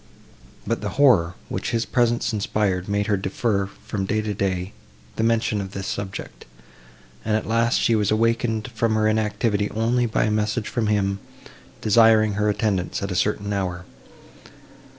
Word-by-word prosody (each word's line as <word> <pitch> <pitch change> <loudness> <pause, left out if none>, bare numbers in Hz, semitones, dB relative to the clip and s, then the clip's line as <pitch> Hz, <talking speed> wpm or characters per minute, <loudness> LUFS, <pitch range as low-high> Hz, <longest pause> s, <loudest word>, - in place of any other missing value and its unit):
But 115 +2 -1
the 105 - -2
horror, 100 -12 +4
which - - -3
his 115 0 0
presence 120 -1 +1
inspired, 100 -3 -1
made 100 0 0
her 105 -1 +1
defer, 100 +1 -1
from 100 0 -5
day 110 +2 0
to 105 -1 -2
day, 95 -1 -2 0.4
the - - -2
mention 115 -2 +1
of 95 0 -7
this 95 -1 -5
subject; 100 -1 -6 0.8
and 110 0 +1
at - - -4
last 115 +1 +2
she 115 - +2
was 105 -3 +2
awakened 115 +1 0
from 115 0 +1
her 110 0 +2
inactivity 105 -1 0
only 120 +2 +1
by 110 - +1
a 110 - +1
message 110 +1 -1
from 115 -3 -1
him, 100 -2 +1 0.6
desiring 110 -1 +5
her 105 +1 +1
attendance 100 -3 -1
at 100 - -3
a - - -2
certain 100 +2 0
hour. 90 -2 -3
105 Hz, 165 wpm, -23 LUFS, 100-115 Hz, 0.8 s, desiring